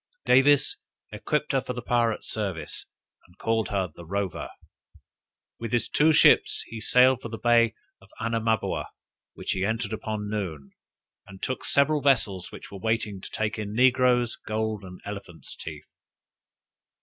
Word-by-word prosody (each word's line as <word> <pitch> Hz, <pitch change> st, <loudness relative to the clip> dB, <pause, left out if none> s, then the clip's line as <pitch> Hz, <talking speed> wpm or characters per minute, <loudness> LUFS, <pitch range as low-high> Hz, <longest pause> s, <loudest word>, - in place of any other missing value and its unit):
Davis 135 Hz, +2 st, +5 dB, 0.3 s
equipped 150 Hz, +8 st, -1 dB
her 135 Hz, -2 st, +2 dB
for 125 Hz, -, -5 dB
the 125 Hz, -, -5 dB
pirate 115 Hz, -2 st, +1 dB
service, 95 Hz, -8 st, -3 dB, 0.4 s
and 90 Hz, +2 st, -24 dB
called 115 Hz, -1 st, 0 dB
her 95 Hz, -2 st, -1 dB
"The 85 Hz, -, -10 dB
Rover." 100 Hz, +2 st, -3 dB, 1.1 s
With 115 Hz, 0 st, -5 dB
his 120 Hz, -, +2 dB
two 155 Hz, +2 st, +4 dB
ships 155 Hz, -, +5 dB
he 110 Hz, -1 st, -8 dB
sailed 125 Hz, +1 st, +5 dB
for 115 Hz, -, -6 dB
the 115 Hz, -, -5 dB
bay 115 Hz, -1 st, +3 dB, 0.3 s
of -, -, -19 dB
Anamaboa, 115 Hz, -1 st, 0 dB, 0.5 s
which -, -, -4 dB
he 95 Hz, -, -1 dB
entered 110 Hz, +1 st, -1 dB
about 110 Hz, -1 st, -3 dB
noon, 95 Hz, -10 st, -4 dB, 0.6 s
and 95 Hz, -1 st, -12 dB
took 130 Hz, -, -3 dB
several 145 Hz, +1 st, +3 dB
vessels 105 Hz, -10 st, +1 dB
which -, -, -11 dB
were 100 Hz, -, -8 dB
there 95 Hz, -, -10 dB
waiting 110 Hz, -3 st, -1 dB
to -, -, -9 dB
take 110 Hz, 0 st, -2 dB
in 105 Hz, 0 st, -4 dB
negroes, 125 Hz, -1 st, +4 dB
gold, 110 Hz, -1 st, -2 dB
and 90 Hz, -1 st, -11 dB
elephants' 100 Hz, -5 st, -8 dB
teeth. 75 Hz, -2 st, -9 dB
110 Hz, 155 wpm, -26 LUFS, 100-125 Hz, 1.1 s, Davis